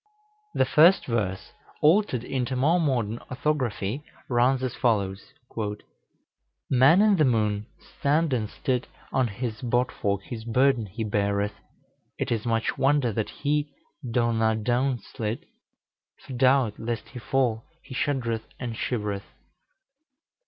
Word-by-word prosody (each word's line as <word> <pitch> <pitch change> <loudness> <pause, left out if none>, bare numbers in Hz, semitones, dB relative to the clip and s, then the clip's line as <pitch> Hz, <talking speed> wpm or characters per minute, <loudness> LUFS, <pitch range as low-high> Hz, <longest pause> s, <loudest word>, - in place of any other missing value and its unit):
The - - +3
first 165 +8 +5
verse, 100 -6 -2 0.3
altered 155 - +3
into 130 0 -2
more 155 +8 +3
modern 120 -8 0
orthography, 130 -4 -1 0.3
runs 125 +1 +3
as 130 - -1
follows: 100 -6 0 1.5
"Man 140 +10 +6
in 210 -2 +4
the 155 - +4
Moon 105 -5 +1 0.3
stand 150 +1 +2
and 110 -4 -1
stit, 130 -3 -1 0.3
On 130 -2 +2
his 110 +1 -5
bot 125 +1 +1
fork 100 -1 -2
his 110 0 -7
burden 125 0 +2
he 110 +5 -5
beareth, 100 -1 0 0.6
It - - -2
is 115 0 -1
much 115 -1 0
wonder 135 -4 +3
that 110 +1 -2
he 150 +1 -1 0.3
do 120 -1 +1
na 110 0 +2
doun 125 +4 +1
slit, 110 +1 -5 0.8
For 135 - -8
doubt 130 -3 +3
lest 115 0 -4
he 125 - -8
fall 125 -3 0 0.2
he 130 - -10
shudd'reth 125 -5 -1
and 120 -3 -4
shivereth. 105 -4 -3
120 Hz, 130 wpm, -26 LUFS, 110-135 Hz, 1.5 s, Man